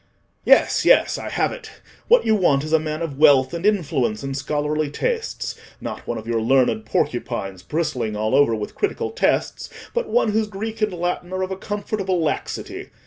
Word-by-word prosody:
Yes, - - +4
yes, - - +4
I - - -5
have - - 0
it. 475 -3 -9 0.4
What 485 +1 +5
you 220 - +3
want 160 -9 +3
is 155 +1 -4
a 160 - +6
man 155 +1 -3
of 145 -4 -5
wealth, 140 -2 +5
and 170 0 -4
influence, 140 - 0
and 135 0 -3
scholarly 150 +2 -1
tastes—not 460 - -4
one 120 - -2
of 110 - -7
your 115 -1 -1
learned 120 -2 +2
porcupines, 95 -3 -2
bristling 125 - -2
all 110 +1 -1
over 140 -5 +4
with 105 -1 -5
critical 410 - -2
tests, 475 - 0 0.2
but 485 0 -1
one 480 - +2
whose 220 0 +1
Greek 220 +2 -6
and 215 -1 +2
Latin 175 0 -3
are 185 0 -1
of 185 - -4
a - - -1
comfortable 195 -2 -2
laxity. 160 -2 -3
155 Hz, 185 wpm, -22 LUFS, 130-205 Hz, 0.4 s, a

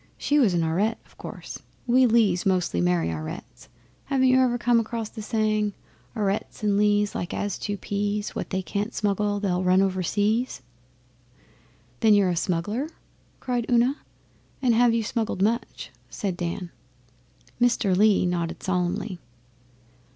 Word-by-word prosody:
She 295 +1 +2
was 210 -10 +3
an 170 - +2
Aurette, 195 +8 0
of - - -24
course. - - -8 0.3
We 255 +1 +5
Lees 215 -6 +3
mostly 180 - +1
marry 85 -2 +1
Aurettes. 80 -1 -7 0.4
Haven't 260 -2 +2
you 255 0 +5
ever 250 -2 +2
come 240 -1 +3
across 225 -1 -3
the 220 - -8
saying: 215 -1 0 0.4
'Aurettes 205 +1 -2
and 205 -1 +2
Lees, 205 0 +2
Like 175 - -4
as 205 -2 -3
two 205 -1 -3
peas. 205 +1 -2
What - - -4
they 190 -1 -2
can't 205 +4 -3
smuggle, 205 0 0
They'll 185 -3 0
run 185 +1 +4
over 190 -1 +1
seas'? 210 - 0 1.4
'Then, 220 -1 +5
are - - +7
you 200 -2 +4
a 175 - 0
smuggler?' 195 - -1
Una 320 - -13 0.5
cried; 245 -2 -2
and, 245 0 -1
'Have 235 0 +4
you 230 - +1
smuggled 220 -3 -1
much?' 230 +4 -2 0.2
said 195 -4 -3
Dan. 175 0 -4 0.9
Mr 230 -6 +3
Lee 205 -1 +4
nodded 175 -2 -2
solemnly. 185 +1 -1
205 Hz, 150 wpm, -25 LUFS, 185-230 Hz, 1.4 s, are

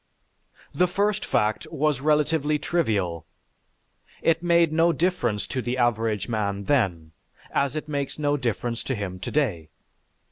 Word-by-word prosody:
The 180 - +3
first 205 +3 0
fact 105 0 0
was 150 -3 0
relatively 150 0 +2
trivial: 100 - -1 1.0
it 165 0 +3
made 170 -2 +3
no 165 +2 +4
difference 125 - 0
to 130 - -3
the 125 +1 -2
average 115 -4 +1
man 100 -3 -2
then, 95 - 0 0.4
as 140 +1 +1
it 155 0 -4
makes 140 -2 -3
no 145 -1 +1
difference 120 -2 -2
to 130 - -1
him 95 -4 -5
today. 90 - -1
135 Hz, 135 wpm, -25 LUFS, 105-155 Hz, 1.0 s, no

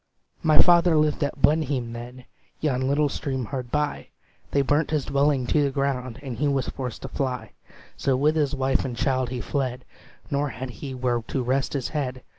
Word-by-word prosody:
"My 155 -1 +4
father 175 -1 +6
lived 150 0 +2
at 145 0 -2
Blenheim 140 -6 +2
then, 125 +2 -8 0.3
Yon 130 -4 0
little 145 +2 +3
stream 135 -3 -3
hard 130 -1 -5
by; 150 +1 -1 0.4
They 140 - +2
burnt 145 +3 +2
his 150 -4 0
dwelling 140 -2 +2
to 150 - +2
the 140 - +2
ground, 130 -3 -2
And 130 -4 -5
he 145 +4 +1
was 140 -2 0
forced 125 -4 -5
to - - -3
fly: 130 -1 -3 0.5
So 135 -2 +1
with 150 +4 +3
his 145 -3 +1
wife 135 0 +1
and 125 -3 -4
child 130 -3 +1
he 125 -1 -3
fled, 130 -3 -2 0.5
Nor 145 0 +1
had 125 +2 -6
he 135 +2 -7
where 125 -2 0
to 130 - -1
rest 130 +2 0
his 140 -4 -2
head. 130 -4 -3
135 Hz, 195 wpm, -25 LUFS, 125-145 Hz, 0.5 s, father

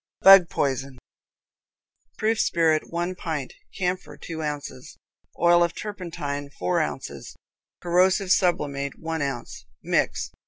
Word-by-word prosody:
Bug 195 -3 +9
Poison. 135 -1 -2 1.2
Proof 220 0 +1
spirit, 160 -2 +2
one 175 +2 -2
pint; 160 -7 -4 0.2
camphor, 180 0 -3
two 160 -2 -7
ounces; 145 -4 -6 0.4
oil 175 +1 +5
of 170 -1 -1
turpentine, 165 -8 -5
four 90 0 0
ounces; - - -5 0.5
corrosive 185 +2 +2
sublimate, 140 -8 +1
one 160 -1 -4
ounce. 120 - -5 0.2
Mix. - - 0
165 Hz, 110 wpm, -25 LUFS, 140-180 Hz, 1.2 s, Bug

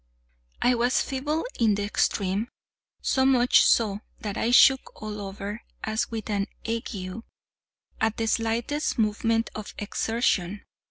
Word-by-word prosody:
I 250 - +5
was 245 +1 +2
feeble 295 - -2
in 220 -3 +4
the 205 - -2
extreme—so 205 +6 -2
much 255 -2 +5
so 210 -3 +3 0.2
that 205 -2 -4
I 230 - 0
shook 265 +2 +5
all 210 -1 -5
over, 200 +2 -6 0.2
as 220 +1 -1
with 225 -2 -5
an 200 -1 -1 0.2
ague, 220 -3 -4 0.8
at 220 0 0
the 225 - -1
slightest 230 +6 0
movement 225 +1 +1
or 215 - -5
exertion. 205 -3 -1
225 Hz, 125 wpm, -26 LUFS, 205-240 Hz, 0.8 s, I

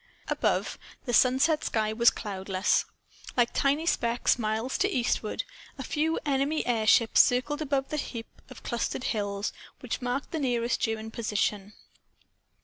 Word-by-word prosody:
Above, - - 0 0.3
the 245 - -2
sunset 265 +6 +4
sky 215 -1 0
was 235 +1 +6
cloudless. 190 -1 -1 0.5
Like 240 -1 +3
tiny 285 +4 +1
specks, 240 -5 +1
miles 220 - -1
to 395 +1 +2
eastward, 240 - -1 0.3
a - - -5
few 320 +2 0
enemy 280 +2 0
airships 225 -1 +5
circled 290 +5 +1
above 275 -2 -1
the 305 - -2
heap 230 -5 -6
of 255 - -12
clustered 235 +1 -2
hills 205 -3 -2 0.3
which 250 0 -4
marked 245 +3 -2
the 320 - -2
nearest 240 -3 0
German 220 -1 -2
position. 210 -2 -2
240 Hz, 140 wpm, -28 LUFS, 220-275 Hz, 0.5 s, was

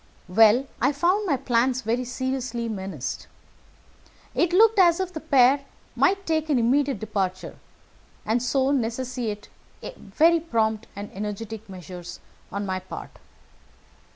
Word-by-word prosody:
"Well, 220 +7 +5 0.2
I 290 - +3
found 365 +8 +1
my 285 -6 +2
plans 255 0 +1
very 235 +3 -1
seriously 250 -2 -3
menaced. 190 - -5 1.1
It 345 0 +1
looked 435 +3 +5
as 345 -2 +5
if 370 -1 -3
the 315 - -4
pair 275 -2 +4 0.3
might 390 0 +2
take 315 -1 0
an 285 - +3
immediate 265 +2 +2
departure, 195 -3 -3 0.7
and 225 +3 +1
so 265 +2 +1
necessitate 240 -4 -2 0.5
very 335 +1 +2
prompt 225 -8 -1
and 205 +1 -7
energetic 210 +2 -6
measures 180 -1 -9 0.3
on 200 0 -3
my 185 -1 -2
part. 185 - -9
245 Hz, 125 wpm, -25 LUFS, 210-285 Hz, 1.1 s, Well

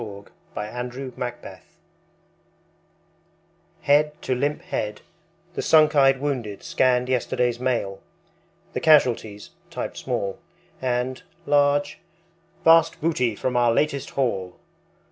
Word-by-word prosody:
Smile, 100 -3 -8 0.3
Smile, 125 +4 -5
Smile 120 -1 -6 2.2
Head 150 +1 +3
to 130 - 0
limp 145 +4 -1
head, 105 0 -4 0.5
the - - -3
sunk 155 -1 +4
eyed 135 -2 +5
wounded 125 -8 -3
scanned 125 -1 +2
Yesterday's 125 -1 0
Mail; 115 -7 -2 0.7
the - - -2
casualties 120 -9 +2 0.2
(typed - - -5
small) 100 -1 -3 0.4
And 125 0 -1 0.2
(large) 145 0 +2 0.6
Vast 165 0 +5
Booty 125 -8 0
from 125 +4 -2
our 120 -1 +4
Latest 140 +2 0
Haul. 95 -9 -2
125 Hz, 105 wpm, -24 LUFS, 120-145 Hz, 2.2 s, eyed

